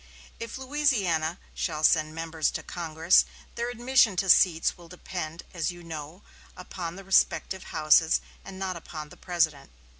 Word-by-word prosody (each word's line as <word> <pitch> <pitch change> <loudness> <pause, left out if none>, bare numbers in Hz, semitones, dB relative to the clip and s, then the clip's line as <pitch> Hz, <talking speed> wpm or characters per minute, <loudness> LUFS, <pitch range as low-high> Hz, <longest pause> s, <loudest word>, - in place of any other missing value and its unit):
If 230 +1 -6
Louisiana 220 - 0 0.2
shall 155 -3 -3
send 155 -1 +3
members 165 -1 -1
to - - -4
Congress, 165 0 +2 0.3
their 235 +1 -3
admission 245 -3 +3
to 190 +1 +4
seats 165 -3 +4
will 175 -1 -15
depend, 170 -2 -6
as 170 -1 -1
you 175 -1 -8
know, 160 +3 -8 0.3
upon 175 -2 -6
the 195 - -10
respective 190 0 +1
houses 155 +1 +4 0.2
and 195 -1 -10
not 190 -1 -3
upon 155 -2 -8
the - - -15
President." 165 -6 -1
175 Hz, 150 wpm, -27 LUFS, 160-195 Hz, 0.3 s, to